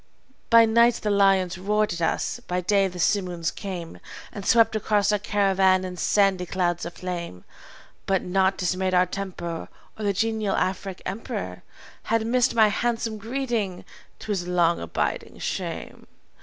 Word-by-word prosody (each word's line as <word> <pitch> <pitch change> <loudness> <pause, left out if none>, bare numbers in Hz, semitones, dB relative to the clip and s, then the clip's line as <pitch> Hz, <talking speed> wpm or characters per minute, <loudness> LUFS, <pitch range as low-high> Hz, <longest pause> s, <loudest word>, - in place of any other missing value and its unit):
"By 230 0 +8
night 235 +1 +4
the 210 - -2
lions 195 -2 +3
roared 210 +2 +1
at 170 - -6
us. 165 - -1
By 180 0 -1
day 195 +2 +2
the 180 -1 -9
simoons 175 -3 0
came 180 -4 -7 0.3
And 200 - -7
swept 225 +1 +4
across 210 -1 +2
our 210 - +1
caravan 190 -2 +2
in 180 -1 -6
sandy 190 -1 +2
clouds 175 -2 -1
of 170 - -9
flame; 170 - -6 0.6
But 190 -1 +1
naught 190 +1 +1
dismayed 185 0 0
our 180 0 +5
temper, 180 -3 -5 0.3
or - - -4
The 200 - +2
genial 215 0 0
Afric 190 0 -2
emperor 195 +5 -5 0.4
Had 225 -1 +1
missed 245 +1 +2
my 220 -2 +6
handsome 230 0 -1
greeting, 225 -5 -3 0.3
to 215 - -6
his 180 -3 -2
long 175 -1 +2
abiding 85 - -3
shame. - - -5
195 Hz, 155 wpm, -25 LUFS, 180-215 Hz, 0.6 s, By